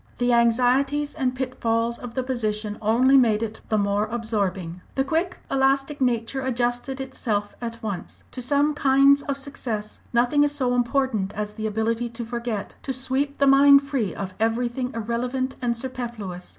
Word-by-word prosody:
The 245 0 +2
anxieties 255 +5 +2
and 260 -4 -1
pitfalls 235 -3 -1
of 240 -1 -8
the 260 - 0
position 215 -4 -2
only 245 +5 +4
made 225 -4 +3
it 220 -1 -5
the 215 - +2
more 205 +1 +1
absorbing. 200 -6 -2
The 270 - +2
quick, 330 +6 -1
elastic 275 +1 +1
nature 245 +1 0
adjusted 245 +1 -1
itself 220 -6 -3
at 230 -1 -6
once. 205 -5 -6
To 255 - -6
some 285 +4 +2
kinds 280 0 +4
of 280 -1 -3
success, 235 -6 -5
nothing 245 +5 +3
is 290 0 +1
so 255 -4 +1
important 245 -5 0
as 210 0 -4
the 220 0 -3
ability 225 +2 -1
to 235 - -4
forget 235 -3 -4
to 270 - -4
sweep 265 +2 -1
the 280 - +3
mind 280 +1 +7
free 265 - -2
of 190 -2 -5
everything 240 +3 0
irrelevant 245 +4 -2
and 235 -2 0
superfluous. 235 -8 -5
245 Hz, 165 wpm, -24 LUFS, 220-270 Hz, -, mind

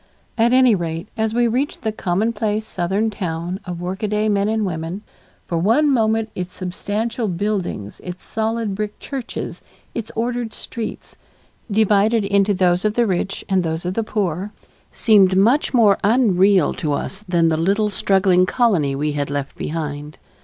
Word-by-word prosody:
At 235 +1 +3
any 255 -2 +5
rate, 170 0 -3
as 220 -1 0
we 240 +1 +2
reached 260 +4 -2
the 220 - 0
common 210 +3 -1
place 215 0 -1
southern 200 +3 -1
town 175 -2 -4
of 175 -2 -5
workaday 210 +4 -1
men 200 0 +1
and 220 -1 0
women, 170 +3 -4 0.4
for 170 - -2
one 235 - +3
moment 220 -2 +1
its 180 0 -6
substantial 210 +5 -3
buildings, 180 - -3
its 180 0 -7
solid 225 -1 -2
brick 210 +1 -4
churches, 265 -4 -6 0.3
its 230 -2 -4
ordered 235 -1 -2
streets, 230 -2 -7 0.5
divided 215 +1 +3
into 200 0 +2
those 180 -1 +2
of 215 0 0
the 240 - +3
rich 195 -1 -2
and 190 -1 +2
those 160 0 -3
of 180 - -1
the 225 - 0
poor, 200 -2 -2 0.4
seemed 195 -5 +4
much 235 +10 +3
more 220 -6 +4
unreal 200 - +4
to 155 -6 -2
us 190 +7 -3
than 170 -2 +3
the 160 - +1
little 200 +6 +1
struggling 190 -2 +3
colony 185 - +2
we 150 +2 -1
had 145 -1 -2
left 140 -1 -3
behind. 150 -1 -5
200 Hz, 160 wpm, -20 LUFS, 175-220 Hz, 0.5 s, any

